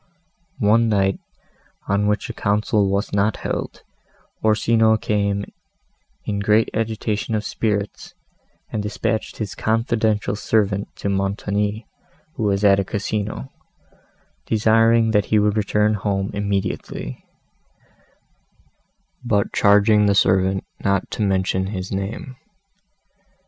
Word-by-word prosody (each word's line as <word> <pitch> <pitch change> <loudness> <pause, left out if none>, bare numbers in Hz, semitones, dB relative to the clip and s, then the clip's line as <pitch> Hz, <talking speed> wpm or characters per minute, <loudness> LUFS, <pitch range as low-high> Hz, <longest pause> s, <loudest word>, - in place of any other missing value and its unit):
One 115 0 +3
night, 95 -2 +1 0.7
on 100 +1 +1
which 105 +4 0
a 115 - -6
council 105 -1 +1
was 100 +2 -1
not 100 +1 +1
held, - - -4 0.6
Orsino 110 +1 +3
came 100 -1 -1 0.8
in 100 -1 -2
great 105 +2 +3
agitation 110 0 -2
of 105 - -2
spirits, 105 -2 -3 0.6
and 110 - -2
dispatched 105 +1 -2
his 105 -3 -4
confidential 110 -2 0
servant 105 -1 0
to 100 - -3
Montoni, 100 +2 -1 0.5
who - - -7
was 100 0 +1
at 100 -1 +5
a - - +1
Casino, 100 - -3 1.0
desiring 115 +1 +3
that 105 -2 +2
he 110 - +2
would 105 0 +2
return 105 0 +1
home 100 -1 -1
immediately; 100 -10 -3 2.0
but 105 -5 0
charging 105 +1 +4
the 100 - +3
servant 95 0 +2 0.2
not 100 -1 0
to - - -4
mention 95 -1 +1
his 95 -2 -5
name. 100 +6 -5
105 Hz, 110 wpm, -21 LUFS, 100-110 Hz, 2.0 s, at